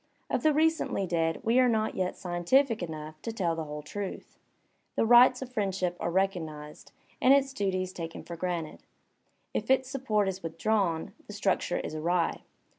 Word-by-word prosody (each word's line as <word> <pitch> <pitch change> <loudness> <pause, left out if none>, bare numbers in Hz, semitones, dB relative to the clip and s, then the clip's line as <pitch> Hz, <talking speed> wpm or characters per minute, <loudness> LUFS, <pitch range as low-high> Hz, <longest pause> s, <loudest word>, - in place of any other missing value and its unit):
Of - - +1
the 310 - +4
recently 315 -9 +1
dead 165 -2 0
we 235 +3 +3
are 255 -1 +5
not 220 -1 +1
yet 185 -1 -2
scientific 215 +8 +1
enough 155 -2 -6
to 230 - -4
tell 180 -7 -1
the 160 -1 -4
whole 150 0 -7
truth. 200 +6 -7 0.6
The - - +2
rights 245 +2 +6
of 255 - -10
friendship 190 -5 -1
are - - -1
recognized, 165 -5 -3 0.3
and 265 +2 +7
its 275 -1 +1
duties 185 -4 -1
taken 165 -2 -6
for 170 - -7
granted. 170 -2 -4 0.7
If - - -3
its 260 0 +3
support 220 -7 0
is 190 0 -3
withdrawn, 170 +1 -1
the 210 - -8
structure 195 -3 0
is - - -4
awry. 170 +2 0
190 Hz, 170 wpm, -29 LUFS, 165-230 Hz, 0.7 s, and